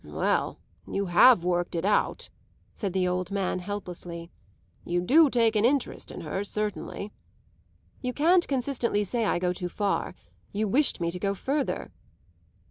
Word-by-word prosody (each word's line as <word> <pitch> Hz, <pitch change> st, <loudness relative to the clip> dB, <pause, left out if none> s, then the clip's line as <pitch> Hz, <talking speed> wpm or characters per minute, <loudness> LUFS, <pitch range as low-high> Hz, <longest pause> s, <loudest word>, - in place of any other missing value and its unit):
"Well, -, -, -1 dB, 0.3 s
you 200 Hz, -, -2 dB
have 180 Hz, +3 st, +6 dB
worked 175 Hz, 0 st, 0 dB
it 165 Hz, -, -1 dB
out," 210 Hz, -, +1 dB, 0.4 s
said 195 Hz, -4 st, -3 dB
the 185 Hz, -1 st, +1 dB
old 180 Hz, 0 st, -1 dB
man 195 Hz, -2 st, -1 dB
helplessly. 175 Hz, -3 st, -6 dB, 0.5 s
"You 175 Hz, +1 st, -1 dB
do 290 Hz, -, +5 dB
take 230 Hz, -3 st, +2 dB
an 210 Hz, -, +3 dB
interest 270 Hz, +3 st, +1 dB
in -, -, -7 dB
her, 180 Hz, +5 st, -3 dB
certainly." 210 Hz, 0 st, -3 dB, 0.9 s
"You 250 Hz, -, -2 dB
can't 345 Hz, +7 st, +3 dB
consistently 245 Hz, -5 st, 0 dB
say 230 Hz, +3 st, -1 dB
I -, -, +1 dB
go 180 Hz, 0 st, 0 dB
too 180 Hz, -1 st, -4 dB
far. 200 Hz, +2 st, -1 dB, 0.4 s
You 210 Hz, +1 st, -1 dB
wished 260 Hz, -1 st, +1 dB
me 170 Hz, 0 st, 0 dB
to 180 Hz, -, -6 dB
go 200 Hz, +1 st, -1 dB
further." 275 Hz, +7 st, -2 dB
200 Hz, 155 wpm, -27 LUFS, 180-240 Hz, 0.9 s, have